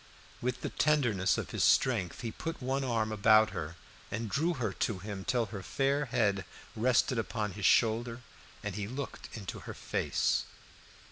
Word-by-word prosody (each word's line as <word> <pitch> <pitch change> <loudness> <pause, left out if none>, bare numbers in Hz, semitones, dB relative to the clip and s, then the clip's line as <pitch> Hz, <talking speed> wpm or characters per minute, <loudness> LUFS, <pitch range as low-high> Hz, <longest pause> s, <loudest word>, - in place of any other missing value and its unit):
With 125 +1 -2
the - - -3
tenderness 120 -11 +2
of - - -4
his - - 0
strength 110 -10 +3
he 115 -2 -3
put 165 +7 -5
one 135 +2 -1
arm 115 -4 0
about 110 +1 +5
her, 80 +2 -5 0.3
and 115 -2 -3
drew 165 - +1
her 115 -8 -2
to 105 0 -1
him 100 0 -6
till 120 +2 +1
her 100 -2 -7
fair 140 +7 +1
head 100 -6 +1 0.3
rested 125 +1 +3
upon 110 -2 -2
his 100 0 +1
shoulder, 115 +1 +3 0.4
and 100 -1 -3
he 100 +1 -3
looked 130 +4 -6
into 100 -4 -6
her - - -8
face. - - 0
115 Hz, 165 wpm, -31 LUFS, 100-130 Hz, 0.4 s, about